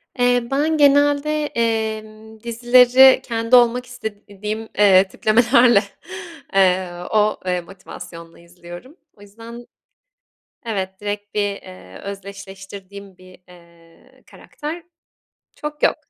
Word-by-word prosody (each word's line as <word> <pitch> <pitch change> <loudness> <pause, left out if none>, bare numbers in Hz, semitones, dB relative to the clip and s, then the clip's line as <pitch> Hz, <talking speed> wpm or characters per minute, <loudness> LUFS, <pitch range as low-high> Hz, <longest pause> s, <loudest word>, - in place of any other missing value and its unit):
Eee, 245 -1 +1
ben 305 +3 0
genelde, 290 +1 +2
emm, 220 -2 -4
dizileri 250 +2 +5
kendi 230 +1 0
olmak 245 0 +3
istediğim, 215 -2 -7
eee, 195 -2 +5
tiplemelerle, 235 +2 +3 0.7
eee, 185 -2 +2 0.2
o, 215 0 +1
eee, 180 -1 -1
motivasyonla 170 -2 -12
izliyorum. 175 - -13 0.2
O - - -20
yüzden 230 +4 -12 1.0
evet, 190 -4 -4
direkt 205 0 -6
bir, 210 - 0 0.2
eee, 90 0 -13
özdeşleştirdiğim 195 0 -10
bir, 185 0 -17
eee, 170 -1 -21
karakter 315 +3 -8 0.7
çok 300 0 -7
yok. - - +3
215 Hz, 100 wpm, -20 LUFS, 190-245 Hz, 1.0 s, dizileri